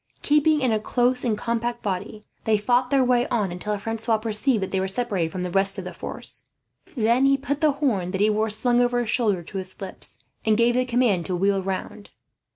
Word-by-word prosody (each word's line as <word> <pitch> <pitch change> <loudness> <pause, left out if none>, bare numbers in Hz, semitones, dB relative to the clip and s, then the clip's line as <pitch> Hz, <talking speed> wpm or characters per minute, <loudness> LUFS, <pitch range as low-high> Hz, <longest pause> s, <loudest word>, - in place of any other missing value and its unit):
Keeping 300 +1 +3
in 255 -3 +2
a 215 - +1
close 245 +3 +1
and 225 -4 0
compact 235 +2 -2
body, 205 +2 -4 0.2
they 220 -1 +3
fought 245 +4 +1
their 275 -1 +3
way 245 -1 +2
on 205 -6 0
until 205 +4 -3
Francois 225 +2 -1
perceived 220 +1 +1
that 190 - -4
they 190 - 0
were 190 - -1
separated 190 -5 -1
from 180 +1 -4
the 180 - -3
rest 195 +2 +1
of 190 - -4
the 180 0 -7
force. - - -8 0.5
Then 235 +4 +3
he 275 0 +4
put 285 +2 -3
the 305 -2 +4
horn 240 -11 0
that 190 +1 -3
he 210 - +5
wore 215 +1 0
slung 240 +3 +1
over 245 0 +2
his 230 - -2
shoulder 205 -8 +1
to 195 +4 -8
his 185 0 -10
lips, 190 -9 -8 0.3
and 215 -1 +2
gave 235 +1 +3
the 250 +1 +1
command 235 -8 +1
to 185 - -1
wheel 195 +2 +1
round. 195 +2 -5
220 Hz, 225 wpm, -24 LUFS, 195-245 Hz, 0.5 s, he